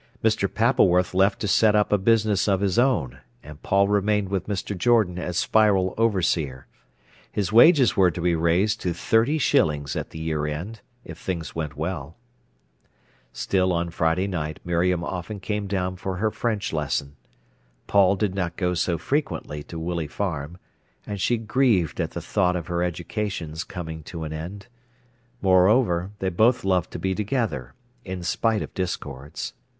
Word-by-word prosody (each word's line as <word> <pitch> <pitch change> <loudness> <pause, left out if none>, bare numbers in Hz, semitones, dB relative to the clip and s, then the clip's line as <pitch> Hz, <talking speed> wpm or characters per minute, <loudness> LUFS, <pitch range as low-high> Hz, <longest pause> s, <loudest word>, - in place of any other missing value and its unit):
Mr. 110 -3 +1
Pappleworth 95 -7 +3
left 95 +2 +3
to 105 - -1
set 105 +1 +4
up 105 0 +2
a - - +5
business 110 -1 +2
of 95 -2 +2
his 100 +2 +1
own, 85 - +1 0.2
and 75 0 -12
Paul 100 +1 +2
remained 105 -1 +1
with 95 -2 -2
Mr. 100 0 -3
Jordan 95 -2 +2
as 90 -1 -3
Spiral 100 -4 +3
overseer. 85 - 0 0.7
His 100 -2 -2
wages 135 +3 +6
were 95 -3 +5
to 85 - -6
be 85 0 +1
raised 85 +6 +1
to 90 -2 -2
thirty 115 - +2
shillings 75 - +1
at - - -4
the - - -10
year 80 -2 -2
end, 90 +10 -5 0.2
if - - -9
things 85 -4 -4
went 75 -3 -4
well. 80 -1 -4 1.2
Still 95 +9 0
on 85 -1 -1
Friday 80 +2 +1
night 80 -6 -4
Miriam 85 0 +1
often 90 +3 -5
came 105 +1 -3
down 95 -2 -2
for 95 0 -4
her 110 +4 0
French 110 -6 -2
lesson. 70 -2 -2 0.7
Paul 100 -1 +4
did 100 -1 -1
not 90 -3 -3
go 90 -1 0
so 85 0 0
frequently 140 - -2
to 85 - -8
Willey 85 -1 -3
Farm, 80 -2 -4 0.5
and 100 -2 -5
she 120 - +2
grieved 110 - +1
at - - -2
the - - -6
thought 90 0 +1
of 85 -3 -3
her 85 0 -2
education's 85 -2 -3
coming 80 -3 -7
to 85 -2 -6
end; 80 +6 -6 0.8
moreover, 95 -1 +3
they 95 - -1
both 110 +8 +3
loved 90 -3 +1
to - - -7
be 95 0 -1
together, 105 - -2 0.3
in 95 -1 -6
spite 110 +4 0
of - - -9
discords. 75 -6 -5
95 Hz, 165 wpm, -24 LUFS, 85-105 Hz, 1.2 s, wages